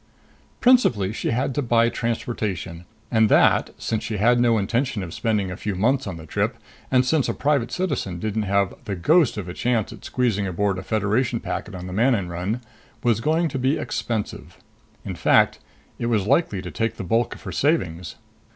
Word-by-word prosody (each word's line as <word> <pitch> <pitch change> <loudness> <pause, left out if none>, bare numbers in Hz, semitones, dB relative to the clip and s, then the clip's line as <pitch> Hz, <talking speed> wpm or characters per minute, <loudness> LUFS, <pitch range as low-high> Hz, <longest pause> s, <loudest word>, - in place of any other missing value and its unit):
Principally, 120 - +4
she - - -2
had 125 +3 0
to 145 - 0
buy 115 -2 +3
transportation. 105 -7 -3 0.3
And 110 -2 +4
that - - +4
since 110 -2 -2
she 110 - -3
had 120 +4 +4
no 120 -2 +4
intention 115 +1 -1
of 85 -2 -7
spending 105 -5 -1
a - - -4
few 105 0 -3
months 125 +6 +1
on 90 -3 -5
the 80 - -10
trip, - - -1 0.3
and 130 -1 +3
since 140 -1 +1
a - - -1
private 140 -4 +1
citizen 145 - -2
didn't 110 +4 -2
have 100 -1 +2
the 100 - -3
ghost 150 - +3
of 100 -3 -4
a 90 - -5
chance 120 -1 0
at - - -14
squeezing 110 -6 0
aboard 95 +1 0
a - - -5
Federation 110 +3 0
packet 105 -2 -5
on 90 0 -7
the 90 - -6
Manon 110 -3 +2
run 90 +8 -3 0.4
was 115 -2 +2
going 160 +6 +2
to 135 - -3
be 130 +4 +1
expensive. 110 -3 -4 0.5
In - - -4
fact, - - +3 0.4
it 115 - -1
was 110 -5 +1
likely 115 - +1
to 90 - -6
take 115 -1 -1
the - - -6
bulk 115 +6 0
of - - -15
her - - -5
savings. 90 - 0
110 Hz, 195 wpm, -23 LUFS, 95-125 Hz, 0.5 s, Principally